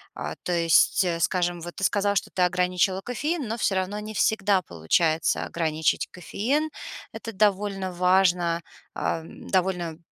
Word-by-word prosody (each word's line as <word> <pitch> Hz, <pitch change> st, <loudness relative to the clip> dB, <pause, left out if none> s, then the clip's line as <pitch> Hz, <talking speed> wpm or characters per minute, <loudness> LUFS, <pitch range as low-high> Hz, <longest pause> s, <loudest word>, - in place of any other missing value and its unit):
А, -, -, -4 dB
то -, -, -3 dB
есть, 170 Hz, +2 st, +4 dB, 0.2 s
скажем, 175 Hz, -1 st, 0 dB
вот 175 Hz, +1 st, -8 dB
ты -, -, -6 dB
сказала, 200 Hz, +1 st, +2 dB
что 195 Hz, -, -1 dB
ты 185 Hz, -, -2 dB
ограничила 180 Hz, +1 st, +2 dB
кофеин, 285 Hz, -, -2 dB
но 225 Hz, +2 st, -3 dB
всё 205 Hz, -3 st, +1 dB
равно 190 Hz, +2 st, -1 dB
не 215 Hz, +1 st, -7 dB
всегда 200 Hz, -2 st, +2 dB
получается 155 Hz, -, +1 dB
ограничить 160 Hz, -2 st, 0 dB
кофеин. 270 Hz, -, -2 dB, 0.4 s
Это 225 Hz, -, -6 dB
довольно 195 Hz, -2 st, 0 dB
важно, 180 Hz, -2 st, +2 dB, 0.3 s
эм, 165 Hz, 0 st, -4 dB
довольно 180 Hz, -4 st, 0 dB
185 Hz, 140 wpm, -25 LUFS, 175-205 Hz, 0.4 s, есть